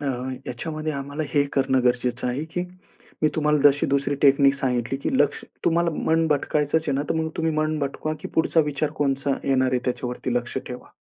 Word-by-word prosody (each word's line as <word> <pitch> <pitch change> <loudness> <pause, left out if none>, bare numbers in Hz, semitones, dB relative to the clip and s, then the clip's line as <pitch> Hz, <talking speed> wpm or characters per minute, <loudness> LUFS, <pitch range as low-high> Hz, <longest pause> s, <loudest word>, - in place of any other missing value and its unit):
अ, 145 - -6
ह्याच्यामध्ये 130 +4 -4
आम्हाला 140 +2 -4
हे 145 -1 +3
करणं 130 -1 +2
गरजेचं 125 0 +1
आहे, 135 +5 -2
की 165 +2 -4 0.6
मी 155 - +5
तुम्हाला 150 -1 +2
जशी 145 0 +5
दुसरी 140 +1 +1
टेक्निक 140 0 +5
सांगितली 125 -2 -1
की - - 0
लक्ष - - +1 0.2
तुम्हाला 170 0 +2
मन 160 +1 +1
भटकायचंच 150 +1 +1
आहे - - +2
ना, 140 - 0
तर - - +2
मग 160 0 0
तुम्ही 160 -1 0
मन 155 0 0
भटकवा, 145 +2 -3
की - - -6
पुढचा 160 0 +3
विचार 145 +1 -1
कोणता 140 -1 +1
येणार 130 -1 +2
आहे 125 - +1
त्याच्यावरती 125 0 -2
लक्ष 120 +2 -1
ठेवा. 125 0 -8
140 Hz, 190 wpm, -24 LUFS, 130-155 Hz, 0.6 s, मी